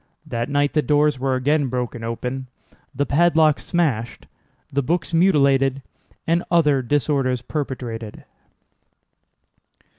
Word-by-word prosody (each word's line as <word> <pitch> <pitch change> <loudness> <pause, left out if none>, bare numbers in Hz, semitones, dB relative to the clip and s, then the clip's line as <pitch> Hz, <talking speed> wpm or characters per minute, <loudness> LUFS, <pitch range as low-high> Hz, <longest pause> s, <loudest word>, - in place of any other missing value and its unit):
That 120 +2 -3
night 145 0 +1
the 150 - +3
doors 150 -2 +2
were 130 0 0
again 145 +3 +1
broken 125 -2 -4
open, 125 +3 -4 0.4
the 140 0 -1
padlocks 160 0 +3
smashed, 135 -10 -1 0.5
the 140 - +1
books 155 +2 -2
mutilated, 140 -6 +3 0.4
and 170 +2 +1
other 150 -6 +3
disorders 130 -2 0
perpetrated." 120 -7 -5
140 Hz, 110 wpm, -21 LUFS, 125-150 Hz, 0.5 s, the